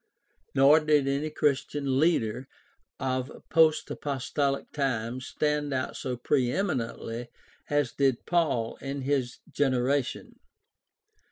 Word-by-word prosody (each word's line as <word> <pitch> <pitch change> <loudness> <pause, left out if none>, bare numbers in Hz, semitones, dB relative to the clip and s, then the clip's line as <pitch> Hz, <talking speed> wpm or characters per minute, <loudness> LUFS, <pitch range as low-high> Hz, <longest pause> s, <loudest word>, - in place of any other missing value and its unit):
Nor 140 +3 +7
did 150 -3 +2
any 140 +3 0
Christian 140 -2 0
leader 130 -6 +1 0.5
of 130 0 -2 0.2
post 160 -1 +4
apostolic 140 0 -2
times 130 -2 -2
stand 150 -2 -1
out 130 - -2
so 125 -2 -4
pre 125 0 +1
eminently 120 - -2 0.4
as 145 -4 +1
did 135 -3 +1
Paul 145 -10 0
in 140 0 -5
his 135 -3 -1
generation. 135 0 0
135 Hz, 105 wpm, -28 LUFS, 130-145 Hz, 0.5 s, Nor